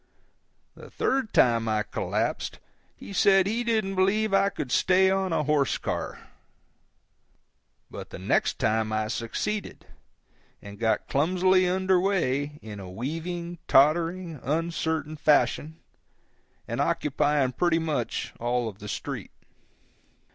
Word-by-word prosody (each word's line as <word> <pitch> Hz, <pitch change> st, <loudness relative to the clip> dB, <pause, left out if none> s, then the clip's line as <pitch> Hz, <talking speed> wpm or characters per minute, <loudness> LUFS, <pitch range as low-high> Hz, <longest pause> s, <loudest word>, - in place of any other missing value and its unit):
The -, -, -13 dB
third 265 Hz, -5 st, -1 dB
time 115 Hz, -2 st, +3 dB
I 110 Hz, -1 st, +1 dB
collapsed -, -, -2 dB, 0.4 s
he -, -, -10 dB
said 195 Hz, 0 st, +4 dB
he 225 Hz, +4 st, -1 dB
didn't 220 Hz, -4 st, 0 dB
believe 195 Hz, +3 st, +1 dB
I 195 Hz, 0 st, +4 dB
could 135 Hz, -9 st, -6 dB
stay 190 Hz, 0 st, +4 dB
on 190 Hz, -1 st, 0 dB
a 155 Hz, -, +1 dB
horse 145 Hz, -2 st, +1 dB
car. -, -, -5 dB, 1.6 s
But -, -, -8 dB
the -, -, -8 dB
next -, -, 0 dB
time 110 Hz, 0 st, 0 dB
I 110 Hz, 0 st, -1 dB
succeeded, 125 Hz, -, -4 dB, 0.7 s
and 100 Hz, 0 st, -11 dB
got 110 Hz, -1 st, 0 dB
clumsily 185 Hz, +5 st, +2 dB
under 185 Hz, 0 st, +2 dB
way 150 Hz, -7 st, 0 dB
in 105 Hz, -2 st, -8 dB
a 95 Hz, -2 st, -8 dB
weaving, 165 Hz, -, -5 dB
tottering, 165 Hz, +3 st, +3 dB
uncertain 160 Hz, +1 st, -2 dB
fashion, 155 Hz, +1 st, +2 dB, 0.9 s
and -, -, -2 dB
occupying 145 Hz, -2 st, +1 dB
pretty 170 Hz, +5 st, +1 dB
much 155 Hz, -8 st, -2 dB
all 120 Hz, 0 st, 0 dB
of 105 Hz, -2 st, -8 dB
the 105 Hz, -, -8 dB
street. -, -, -5 dB
160 Hz, 125 wpm, -26 LUFS, 125-185 Hz, 1.6 s, said